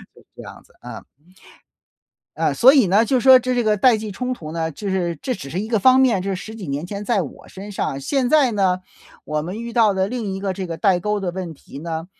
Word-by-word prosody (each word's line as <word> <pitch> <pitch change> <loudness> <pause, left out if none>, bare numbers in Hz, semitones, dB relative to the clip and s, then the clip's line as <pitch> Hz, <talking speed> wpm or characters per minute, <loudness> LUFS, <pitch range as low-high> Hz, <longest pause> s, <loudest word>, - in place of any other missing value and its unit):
就 - - -18
是 - - -30
这 - - -8
样 - - -12
子， - - -27
啊。 - - -9 1.3
嗯， - - 0
所 260 +3 +7
以 270 -7 +4
呢， 200 +5 +3
就 255 +3 +1
说 260 +1 +7
这 255 +1 -2
这 245 -1 0
个 215 -1 +2
代 245 +2 +4
际 215 0 -6
冲 250 +5 -3
突 155 -11 -7
呢， 160 -1 -2
就 200 +7 -7
是 175 -3 -1
这 255 - -2
只 140 -10 -9
是 175 - -4
一 215 - -4
个 225 -2 +1
方 255 +5 +5
面， 235 -8 +2
就 195 - -3
是 190 - -2
十 220 +4 -9
几 205 -8 -8
年 140 +4 -3
前 200 +2 -6
在 210 -4 +1
我 145 - -10
身 200 +2 -10
上， 140 -7 -3
现 255 - 0
在 280 -4 +3
呢， 190 -3 +1 0.4
我 150 0 -2
们 185 +7 -6
遇 235 0 -6
到 225 -4 +4
的 190 0 0
另 225 -4 -4
一 190 - -6
个 195 -1 -2
这 185 0 -5
个 165 -1 -5
代 185 -1 +2
沟 210 +3 -1
的 185 -3 -3
问 180 -2 -5
题 135 - -13
呢， 165 +1 -5
200 Hz, 285 characters per minute, -21 LUFS, 175-235 Hz, 1.3 s, 所